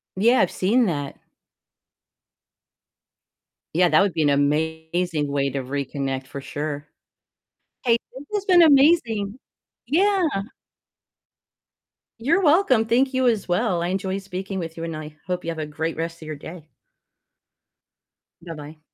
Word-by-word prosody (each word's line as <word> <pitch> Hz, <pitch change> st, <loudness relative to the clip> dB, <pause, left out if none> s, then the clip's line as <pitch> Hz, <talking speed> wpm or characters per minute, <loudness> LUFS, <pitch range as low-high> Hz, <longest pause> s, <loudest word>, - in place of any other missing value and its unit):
Yeah, 235 Hz, +7 st, +4 dB
I've -, -, +2 dB
seen 230 Hz, +6 st, +2 dB
that. 145 Hz, -4 st, -3 dB, 2.6 s
Yeah, 180 Hz, +1 st, +4 dB
that -, -, +5 dB
would 200 Hz, -3 st, +1 dB
be 160 Hz, -, +1 dB
an 145 Hz, -, +3 dB
amazing 160 Hz, +2 st, 0 dB
way 140 Hz, -1 st, +1 dB
to 135 Hz, -, -2 dB
reconnect, 135 Hz, 0 st, -3 dB
for 140 Hz, 0 st, -7 dB
sure. 145 Hz, +1 st, -5 dB, 1.0 s
Hey, 235 Hz, -1 st, +4 dB, 0.2 s
this 280 Hz, -, -9 dB
has 400 Hz, -1 st, -2 dB
been 360 Hz, -2 st, +6 dB
amazing. 270 Hz, -8 st, +4 dB, 0.5 s
Yeah. 380 Hz, +5 st, +3 dB, 2.0 s
You're 335 Hz, +10 st, +2 dB
welcome, 295 Hz, -, +4 dB
thank 255 Hz, +4 st, +2 dB
you 260 Hz, -1 st, +3 dB
as 220 Hz, -4 st, -1 dB
well, 175 Hz, -1 st, +1 dB
I 175 Hz, -, -1 dB
enjoyed 190 Hz, +1 st, -2 dB
speaking 190 Hz, 0 st, -5 dB
with 165 Hz, -1 st, -6 dB
you, 165 Hz, -, -6 dB
and 165 Hz, 0 st, -4 dB
I 155 Hz, 0 st, -8 dB
hope 180 Hz, -2 st, -3 dB
you 170 Hz, -, -1 dB
have 165 Hz, -, -7 dB
a 155 Hz, -, -3 dB
great 160 Hz, +2 st, -3 dB
rest 165 Hz, +1 st, -5 dB
of -, -, -9 dB
your 155 Hz, 0 st, -5 dB
day. 160 Hz, +2 st, -10 dB, 1.8 s
Bye-bye. 155 Hz, -2 st, -9 dB
175 Hz, 140 wpm, -23 LUFS, 155-230 Hz, 2.6 s, been